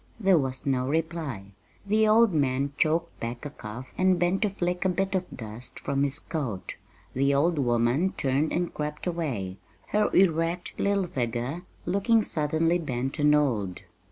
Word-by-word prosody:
There 195 -5 +4
was 130 -2 -1
no 130 -2 +1
reply. 150 - -3 0.3
The 215 +2 +3
old 220 -1 +5
man 140 -1 +1
choked 165 +3 0
back 120 +4 -5
a 145 - -5
cough 125 0 -9
and 185 -1 +4
bent 175 +2 +1
to 210 - +2
flick 180 -2 -2
a 190 - +2
bit 190 +2 -1
of 185 -1 -1
dust 115 +1 -5
from 140 -1 -1
his 140 0 +1
coat. 135 - -4 0.4
The 140 +2 +2
old 160 +3 +2
woman 120 +8 +2
turned 140 +3 +1
and 175 0 -1
crept 150 0 -4
away, 135 - -2 0.3
her 210 0 +2
erect 170 -1 +1
little 200 -1 +2
figure 125 +2 -2 0.2
looking 200 +5 +3
suddenly 160 +2 +1
bent 135 -2 -3
and 150 0 +5
old. 110 -11 0
150 Hz, 160 wpm, -27 LUFS, 130-180 Hz, 0.4 s, old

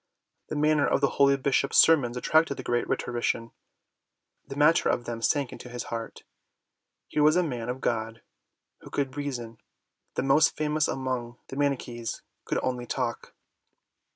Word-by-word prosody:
The - - -3
manner 150 0 +3
of - - +2
the 140 -1 +2
holy 140 0 +6
Bishop's 140 0 +1
sermons 130 -7 +5
attracted 155 +2 +2
the - - -6
great 120 0 -1
Rhetorician: 120 -1 -1 1.0
the 135 - -7
matter 150 +3 +4
of 120 - 0
them 115 -1 -5
sank 140 +2 +1
into 125 - -10
his 120 0 -5
heart. 115 -1 -6 0.8
Here 150 - -1
was 155 +2 +5
a 180 - +3
man 125 -7 -4
of 130 +2 -4
God 115 -1 -2 0.6
who - - -13
could 135 -2 -2
reason: 120 -6 -5 0.6
the - - 0
most 135 +4 +4
famous 155 0 +1
among 125 -2 -3
the - - -7
Manichees 125 -5 -2 0.2
could - - -1
only 125 -1 -2
talk. 125 -2 -3
130 Hz, 155 wpm, -27 LUFS, 120-145 Hz, 1.0 s, holy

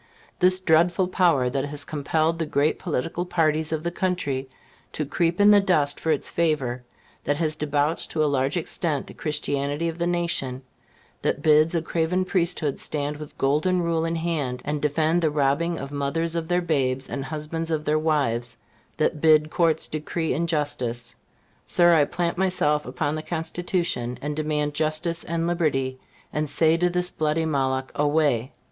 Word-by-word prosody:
This 185 0 +4
dreadful 175 +1 +3
power, 170 -9 +3
that 135 +2 -1
has 145 0 -2
compelled 155 +2 0
the 160 - -1
great 150 +1 +1
political 165 +1 -2
parties 160 -3 +1
of 160 -1 -2
the 170 - -1
country 145 -8 -2 0.4
to 150 - -2
creep 170 +5 0
in 205 +1 +7
the 205 - +7
dust 155 -7 +1
for 160 - -3
its 150 -3 +1
favor; 145 -7 0 0.4
that 145 - 0
has 155 -1 0
debauched 150 +1 -1
to 155 - 0
a - - +3
large 140 +1 +1
extent 160 -3 -1
the - - -11
Christianity 145 0 -2
of 165 +1 -4
the 170 - +1
nation; 170 -7 -1 0.6
that 145 - -1
bids 155 +2 +4
a 165 - 0
craven 170 +3 0
priesthood 170 -6 0
stand 145 0 -2
with 150 0 -10
Golden 155 +7 +2
Rule 165 -1 0
in 165 0 -1
hand, 155 -7 -2
and 150 0 -2
defend 155 +3 +1
the 160 - +2
robbing 150 +4 +1
of 140 -1 -6
mothers 150 +4 -1
of 165 -1 -2
their 175 +1 +1
babes, 135 -5 0
and 140 - -4
husbands 155 +2 -4
of 155 -2 -1
their 155 +1 +2
wives; 140 -7 0 0.4
that 150 - 0
bids 155 -1 +4
courts 165 -2 +2
decree 155 +1 -2
injustice; 145 -7 -2 0.5
Sir, 175 -1 +5
I 150 -3 +5
plant 170 +3 -2
myself 150 -6 +1
upon 145 -2 -2
the 155 - -3
Constitution, 165 -6 -2
and 150 +3 -4
demand 150 -1 -1
justice 155 +3 0
and 165 0 -2
liberty, 135 -7 0 0.3
and 150 -1 -1
say 160 +2 +3
to 180 +1 +2
this 180 0 -1
bloody 155 +1 0
Moloch, 130 -3 -1
Away! 145 -4 +1
155 Hz, 170 wpm, -24 LUFS, 145-170 Hz, 0.6 s, in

